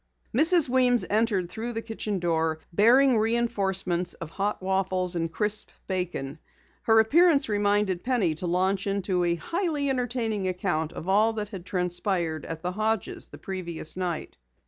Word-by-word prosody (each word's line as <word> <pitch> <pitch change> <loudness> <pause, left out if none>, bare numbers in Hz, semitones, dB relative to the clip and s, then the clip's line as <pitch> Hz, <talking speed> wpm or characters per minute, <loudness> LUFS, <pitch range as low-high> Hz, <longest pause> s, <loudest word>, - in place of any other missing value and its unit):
Mrs. 320 +4 +5
Weems 250 -1 +3
entered 210 -4 +1
through 225 +7 -5
the 225 0 -4
kitchen 215 -2 -3
door, 165 -2 0 0.2
bearing 240 +5 +5
reenforcements 195 -6 0
of 165 -1 -8
hot 205 +3 -2
waffles 185 -1 0
and 165 -1 -2
crisp 210 +3 -1 0.2
bacon. 170 -6 -3 0.4
Her 225 0 +4
appearance 305 +4 +4
reminded 205 -3 +1
Penny 240 -10 +1
to 170 +3 -5
launch 190 +3 0
into 195 -2 0
a 170 -1 +1
highly 305 - -1
entertaining 235 -6 -1
account 175 -4 -1
of 165 - -8
all 215 +4 +3
that 210 -2 -4
had 190 -4 -9
transpired 175 -2 -1
at 165 -1 -6
the 180 - -1
Hodges' 215 0 -1
the - - -12
previous 170 -4 -4
night. 180 -3 -4
195 Hz, 150 wpm, -26 LUFS, 180-225 Hz, 0.4 s, Mrs